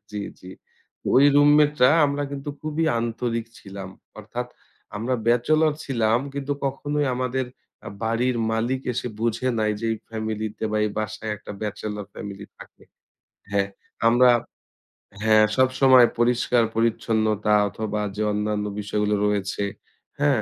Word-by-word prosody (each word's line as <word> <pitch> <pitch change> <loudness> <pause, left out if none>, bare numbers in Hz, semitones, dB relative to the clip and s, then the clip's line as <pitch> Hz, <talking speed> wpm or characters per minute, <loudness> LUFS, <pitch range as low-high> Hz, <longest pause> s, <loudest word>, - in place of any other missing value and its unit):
জি, 105 - -4 0.2
জি, 90 - -11 0.6
ওই 135 - +6
রুমমেটটা 145 -2 +5 0.2
আমরা 140 0 -2
কিন্তু 140 +1 -6
খুবই 155 +1 -1
আন্তরিক 115 0 -2
ছিলাম। 100 -1 -8 0.3
অর্থাৎ 120 +4 -5 0.5
আমরা 120 +5 -1
ব্যাচেলর 155 +7 +3
ছিলাম 115 -4 +1 0.2
কিন্তু 140 0 -2
কখনোই 145 +2 -1
আমাদের 130 0 -1 0.4
আ - - -4 0.2
বাড়ির 120 +2 +1 0.2
মালিক 120 +4 0
এসে 120 - -3
বুঝে 115 +2 0
নাই 110 -1 +1
যে - - -5
এই - - -2
ফ্যামিলি 110 -1 -3
তে - - -3
বা, 110 - -1
এই 105 - -1
বাসায় 110 +1 -3
একটা 105 - -9
ব্যাচেলর 105 0 -4
ফ্যামিলি 100 0 -7
থাকে। - - -15 0.7
হ্যাঁ, 100 -1 +1 0.4
আমরা 120 +2 +6 0.9
হ্যাঁ 110 -1 +6
সবসময় 130 -1 +6
পরিষ্কার-পরিচ্ছন্নতা 115 -3 +1 0.2
অথবা 105 +2 -3
যে 105 - -3
অন্যান্য 105 0 -1
বিষয়গুলো 105 0 0
রয়েছে। 100 -1 -1 0.6
হ্যাঁ? 140 -5 +3
115 Hz, 130 wpm, -24 LUFS, 105-130 Hz, 0.9 s, ওই